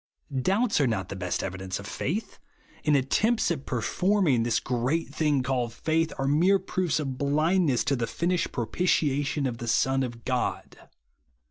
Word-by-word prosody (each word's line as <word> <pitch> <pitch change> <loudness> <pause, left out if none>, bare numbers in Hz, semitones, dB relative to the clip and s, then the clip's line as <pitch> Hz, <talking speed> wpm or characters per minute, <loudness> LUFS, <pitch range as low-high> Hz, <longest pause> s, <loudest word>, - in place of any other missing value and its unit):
Doubts 195 - +2
are 135 - +3
not 95 -6 -2
the - - -5
best 90 -1 -2
evidence 95 0 -4
of 100 - -9
faith; 180 - -4 0.4
and 150 -1 +3
attempts 215 - +1
at 145 -5 -4
performing 160 - +1
this 115 0 +1
gTeat 130 +7 -1
thing 150 -4 +1
called 125 -3 -1
faith 160 +3 0
are 135 - -1
mere 175 +8 +4
proofs 185 -4 -1
of 135 -4 -4
blindness 155 0 +2
to 140 - +1
the 120 -2 -2
finished 175 +5 -1
pro^Ditiation 145 +2 0
of 120 -2 -5
the 120 - -5
Son 135 +4 +2
of 120 -3 -5
God. 125 -1 -3
140 Hz, 160 wpm, -27 LUFS, 120-165 Hz, 0.4 s, mere